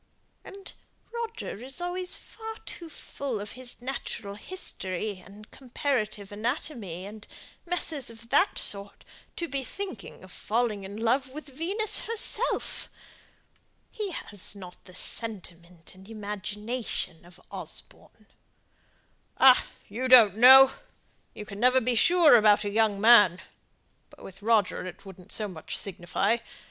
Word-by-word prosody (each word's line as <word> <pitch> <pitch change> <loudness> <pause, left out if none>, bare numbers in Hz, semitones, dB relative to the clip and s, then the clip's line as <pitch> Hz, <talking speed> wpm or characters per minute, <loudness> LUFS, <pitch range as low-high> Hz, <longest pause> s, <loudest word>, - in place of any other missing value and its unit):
"And 390 0 -11 0.4
Roger 455 - -5
is 265 +5 -2
always 360 +1 -1
far 445 0 -9
too 335 -2 -8
full 275 -6 -6
of 205 0 -7
his 250 -1 -4
natural 240 -5 -5
history 205 - -4
and 205 +3 -15
comparative 240 -6 -3
anatomy, 215 - -4
and 210 +1 -11 0.4
messes 320 -7 0
of 230 0 -13
that 320 +9 +3
sort, 200 0 +1 0.3
to 340 - -4
be 275 -2 -3
thinking 320 - -7
of 185 - -13
falling 220 -1 -1
in 200 +2 -8
love 250 +4 +1
with 300 +2 -10
Venus 395 +8 +1
herself. 460 +1 +1 1.0
He 425 -3 -4
has 205 - -2
not 180 -3 -12
the 185 - -14
sentiment 175 -7 -4
and 190 +2 -16
imagination 210 -3 -5
of 175 +1 -17
Osborne." - - -9 1.1
"Ah, 260 -1 +6 0.2
you 245 +6 -3
don't 230 -6 +8
know; 265 +3 +9 0.6
you 210 - -7
never 250 +6 +3
can 255 - +1
be 250 - +2
sure 335 +4 +6
about 210 -2 +5
a 205 - -3
young 215 -2 +2
man! 205 -5 +6 0.7
But - - -17
with 195 - -11
Roger 215 -4 +1
it 185 - -11
wouldn't 190 -2 -13
so 215 - -1
much 175 -5 -6
signify. 200 +4 -1
225 Hz, 135 wpm, -27 LUFS, 200-270 Hz, 1.1 s, know